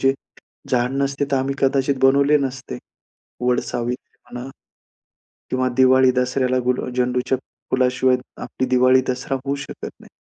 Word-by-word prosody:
जे 135 0 +4 0.6
झाड 125 0 +1
नसते 140 +1 -1
तर 135 - +2
आम्ही 135 +1 -1
कदाचित 135 0 +2
बनवले 140 +2 +5
नसते. 130 - -4 0.7
वटसावित्री 125 0 -2
म्हणा 125 +2 -8 1.0
किंवा 130 0 0
दिवाळी-दसऱ्याला 130 0 +3
गुला 125 0 0
झेंडूच्या 125 +1 0 0.3
फुलाशिवाय 130 0 +2 0.3
आपली 130 - -3
दिवाळी-दसरा 130 +1 +2
होऊ 140 +1 0
शकत 140 - -7
नाही. - - -16
130 Hz, 115 wpm, -21 LUFS, 125-135 Hz, 1.0 s, बनवले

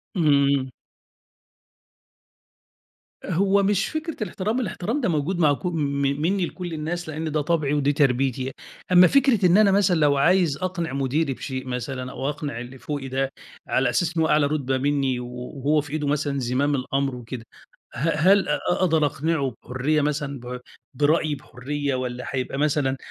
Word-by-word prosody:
امم. 140 -5 +3 2.6
هو 200 +3 +2
مش 200 +1 +1
فكرة 315 +1 -4
الاحترام، 210 +5 -2
الاحترام 230 +4 -2
ده 235 - +1
موجود 165 +3 -1
مع 150 -4 +4
ك 140 - -7
م 180 - 0 0.5
منّي 185 +3 +1
لكل 175 -1 -6
الناس، 160 +2 -4
لإن 155 +1 -4
ده 155 0 +1
طَبعي 150 -2 0
ودي 145 -1 +2
تربيتي. 130 -2 +1 0.4
أمّا 180 0 +8
فكرة 260 -4 +3
إن 180 +2 +5
أنا 210 -2 +5
مثلًا 195 -2 +3
لو 145 -2 +3
عايز 170 0 +3
أقنِع 170 -3 -3
مُديري 140 +2 0
بشيء 130 0 -6
مثلًا 130 +1 -4
أو 135 - -3
أقنِع 145 -4 -4
اللي 125 +2 -8
فوقي 145 -1 -4
ده 135 +1 -1 0.4
على 130 -1 +2
أساس 165 +8 0
إنه 160 - +3
هو - - 0
أعلى 150 -1 +4
رُتبة 135 -3 -1
منّي 135 -2 0
و 125 - -6
وهو 135 +4 -1
في 145 0 -10
إيده 150 -2 -1
مثلًا 145 -1 0
زِمام 135 +4 +1
الأمر 135 0 -1
وكده، 120 -1 -8 0.5
ه 130 +7 -1
هل 185 +5 +4
أ 150 - +1
أقدر 165 -4 +2
أقنِعُه 145 -2 -1
بحُرية 135 +5 0
مثلًا 145 -2 -2
ب 125 +1 -7 0.3
برأيي 150 +2 +2
بحُرية 140 +2 -4
والّا 125 -1 -3
هيبقى 130 0 -3
مثلًا 145 -2 +1
145 Hz, 165 wpm, -24 LUFS, 135-170 Hz, 2.6 s, أمّا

